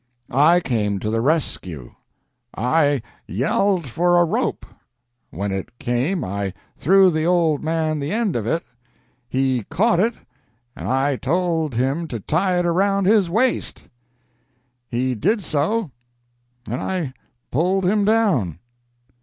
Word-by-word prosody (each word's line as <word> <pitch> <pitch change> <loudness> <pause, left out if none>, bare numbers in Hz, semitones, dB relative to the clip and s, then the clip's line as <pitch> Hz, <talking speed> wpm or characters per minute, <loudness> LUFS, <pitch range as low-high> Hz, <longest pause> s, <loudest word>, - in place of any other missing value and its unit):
I 155 +7 +5
came 105 - -1
to 105 +2 -2
the 115 0 0
rescue. 95 - -2 0.6
I 145 +2 +2 0.2
yelled 190 -6 0
for 175 +7 +2
a 175 - +5
rope. 160 - -1 0.6
When 100 +2 -3
it 95 +5 -5
came 130 +9 -1
I 100 -1 -3 0.2
threw 190 +3 +5
the 155 -1 -1
old 170 -4 +2
man 155 -1 0
the 145 +2 -3
end 220 -4 0
of 115 -2 -2
it. 165 +7 0 0.7
He 130 -2 0
caught 180 +3 +2
it, 225 +4 +2 0.6
and - - -6
I 135 +1 +1
told 160 -1 0
him 135 +7 0
to 120 -6 -5
tie 180 - 0
it 175 - +1
around 195 +3 +2
his 200 -3 +4
waist. 230 +7 0 1.0
He 125 +2 0
did 205 - 0
so, 165 +5 -1 0.7
and 120 +3 -4
I 175 -8 -2 0.4
pulled 180 +7 +1
him 205 +3 +2
down." 195 - +2
160 Hz, 135 wpm, -21 LUFS, 125-185 Hz, 1.0 s, I